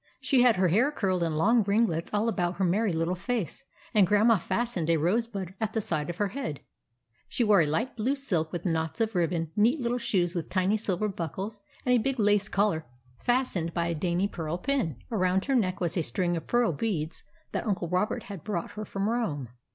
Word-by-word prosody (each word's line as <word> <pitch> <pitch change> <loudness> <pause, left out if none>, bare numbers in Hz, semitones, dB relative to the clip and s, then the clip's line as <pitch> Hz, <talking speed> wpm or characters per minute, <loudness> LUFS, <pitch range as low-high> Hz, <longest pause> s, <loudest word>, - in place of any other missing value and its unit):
She 265 -3 +3
had 245 -3 +6
her 185 -1 +2
hair 235 - +3
curled 190 -10 0
in 165 -2 0
long 225 +9 +4
ringlets 200 -5 +1
all 210 +2 +1
about 180 -5 0
her 195 - -1
merry 200 +4 +2
little 165 +2 0
face, 230 +4 -3 0.3
and 205 -5 +5
Grandma 210 +2 +4
fastened 215 -4 -1
a 165 - +4
rose 195 +10 +1
bud 195 -5 -6
at 220 0 -1
the 225 - +1
side 155 -7 -2
of 175 - -4
her 205 -1 0
head. 190 - -5 0.7
She 245 - 0
wore 210 -4 +5
a 155 - +2
light 215 - -1
blue 250 +5 0
silk 180 - -1
with 175 +1 -5
knots 160 +2 -1
of 225 -1 +1
ribbon, 170 -3 0
neat 235 +8 +3
little 245 0 -1
shoes 180 -7 0
with 170 -3 -4
tiny 185 +2 +2
silver 210 -1 -1
buckles, 195 +3 -5 0.3
and 250 - +3
a 245 - +5
big 270 +3 -1
lace 205 -1 +3
collar 195 -7 +1 0.3
fastened 240 -10 0
by 170 -1 0
a - - 0
dainty 175 +4 0
pearl 165 -3 -4
pin. 235 - -1
Around 190 -3 +1
her 275 - 0
neck 185 -6 +1
was 175 -3 -1
a 175 - +2
string 175 +6 0
of 165 - -5
pearl 240 -7 +2
beads 160 -2 -2 0.3
that - - -3
Uncle 190 -4 -1
Robert 180 +5 0
had 195 -6 -8
brought 200 -5 -3
her 215 0 -6
from 195 +1 -2
Rome. 165 - -1
195 Hz, 215 wpm, -28 LUFS, 170-225 Hz, 0.7 s, had